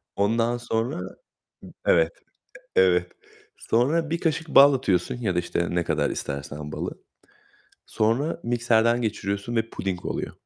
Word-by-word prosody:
Ondan 115 +4 +1
sonra, 115 -3 -2 0.6
b - - -11 0.2
evet, 80 -1 +4 0.7
evet. 90 -1 +3 0.4
Sonra 150 +7 +1
1 170 - 0
kaşık 160 -1 -1
bal 140 -1 +7
atıyorsun 95 -10 0
ya 110 -7 -2
da, - - 0
işte, 85 0 -1
ne 85 -1 +1
kadar - - 0
istersen 75 +2 -5
balı. - - -3 1.0
Sonra 120 +10 0
mikserden 115 0 +2
geçiriyorsun 100 +1 -3
ve 115 0 0
puding 95 -2 -4
oluyor. - - -3
115 Hz, 130 wpm, -25 LUFS, 90-120 Hz, 1.0 s, bal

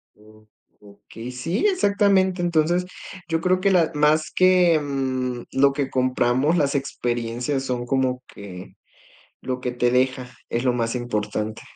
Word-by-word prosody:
O 110 0 -20 0.3
okey, 105 +4 -11
sí, 165 - -2
exactamente, 200 - +2
entonces, 175 +1 +1 0.4
yo 165 0 -1
creo 185 +1 +2
que 195 +1 +2
la 170 -4 +3
más 150 +1 +2
que, 180 -3 +4
mm, 130 -4 -3
lo 140 +1 +4
que 140 -1 -2
compramos, 130 +3 +1
las 145 -3 +1
experiencias 120 0 -2
son 125 -2 -3
como 130 0 0
que, 95 -3 -11 0.7
lo 130 -1 -3
que 125 -1 -3
te 120 0 +1
deja, 130 0 0 0.2
es 120 +1 -2
lo 125 - +3
más 115 0 -1
importante. 110 -2 -3
130 Hz, 145 wpm, -23 LUFS, 120-165 Hz, 0.7 s, que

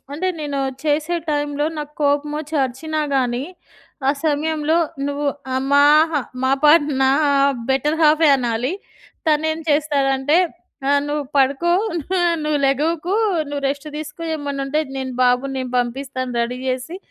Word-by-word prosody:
అంటే 325 +6 -2
నేను 290 -2 -3 0.2
చేసే 305 +3 0
టైమ్‌లో 290 0 0
నాకోపమొచ్చి 295 +1 -2
అరిచినా 305 +5 -3
గానీ, 250 -1 0 0.6
ఆ - - +6
సమయంలో 310 +1 +1 0.3
నువ్వు 285 +1 -2 0.3
ఆమాహ్ 290 +4 +4 0.3
మా 260 - +2
పాట 300 +3 +7 0.2
నా 265 - +4 0.6
బెటర్ 290 +4 +1
హాఫే 310 +1 +5
అనాలి. 245 +3 -1 0.5
తను 310 0 +2
ఏం 315 - -6
చేస్తాడంటే 290 -1 +2 0.5
ఆహ్, 285 0 +4
"నువ్వు 295 0 -2
పడుకో. 275 +5 +2 0.7
నువ్వు 300 -1 0
లెగవకు. 315 +6 0 0.4
నువ్వు 285 -1 -4
రెస్ట్ 285 +2 -4
తీసుకో 305 +2 -7
ఏమన్నా 285 -2 -4
ఉంటే 300 +3 0 0.2
నేను 260 -1 -4
బాబుని 250 +2 +2
నేను 255 -1 -4
పంపిస్తాను 255 +1 -3
రెడీ 240 +2 -2
జేసి, 260 +7 -3
290 Hz, 125 wpm, -20 LUFS, 270-305 Hz, 0.7 s, పాట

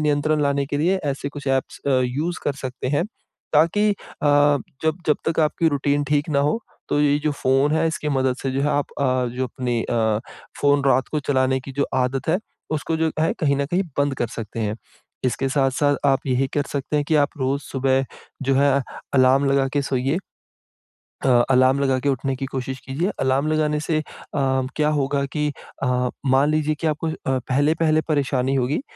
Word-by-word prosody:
नियंत्रण 150 0 +1
लाने 140 -1 +1
के 145 - -2
लिए 180 +6 +2
ऐसे 140 0 -2
कुछ 145 -1 -9
ऐप्स 135 -1 -1
अ, - - +2
यूज़ 150 +8 -2
कर 145 - +1
सकते 130 0 -4
हैं 145 +2 +1 0.5
ताकि 190 +8 +4
अ, 205 - +1 0.3
जब 145 +2 +2
जब, 150 - +3
तक 160 - +1
आपकी 160 +2 +2
रूटीन 145 0 0
ठीक 145 +1 +1
ना 140 - +2
हो, 150 +10 +1 0.3
तो 145 - +1
ये 145 0 +3
जो 150 - +2
फ़ोन 135 +3 +3
है 165 +1 +2
इसकी 150 -1 -3
मदद 130 -2 +1
से 135 - -1
जो 135 +1 -1
है 145 - +2
आप 145 0 -1
अ, 130 -2 +1
जो 130 +1 -1
अपनी 125 -2 -2
अ, 110 -2 0 0.4
फ़ोन 145 -1 +3
रात 135 -1 +3
को 150 - -1
चलाने 130 -1 +2
की 135 +1 -9
जो 140 - +2 0.2
आदत 130 +3 -3
है, 170 +3 +3 0.3
उसको 155 +1 -1
जो 160 0 +1
है 160 - +2
कहीं 140 -3 +2
न 140 0 0
कहीं 180 +5 +1 0.2
बंद 140 -1 +2
कर 120 - -1
सकते 115 0 -5
हैं। 105 0 -1 0.5
इसके 135 +1 0
साथ-साथ 140 +1 +2
आप 135 0 +3
यही 130 +1 +1
कर 145 - +2
सकते 145 +1 -2
हैं 145 - +1
कि 160 - 0
आप 145 -1 +4
रोज़ 135 +1 0
सुबह, 135 0 0 0.4
जो 135 0 +1
है 140 0 +4 0.4
अलार्म 130 +1 +5
लगा 135 -1 +3
के 145 - +2
सोइए, 135 +5 0 1.3
अलार्म 130 +1 +4
लगा 135 -2 +2
के 140 - 0
उठने 135 0 -1
की 135 - -4
कोशिश 130 0 -4
कीजिए। 155 +10 -1
अलार्म 135 +3 +1
लगाने 150 -1 +1
से 155 0 0
अ, - - -4 0.3
क्या 135 +2 +1
होगा 140 0 0
कि 150 -1 0 0.3
अ, 125 -1 +1 0.2
मान 135 +2 +3
लीजिए 155 0 +1
कि 160 - +1
आपको 155 +1 -1
अ, - - -3 0.4
पहले-पहले 155 +3 +2
परेशानी 135 -2 +1
होगी 135 - 0
140 Hz, 195 wpm, -22 LUFS, 130-150 Hz, 1.3 s, अलार्म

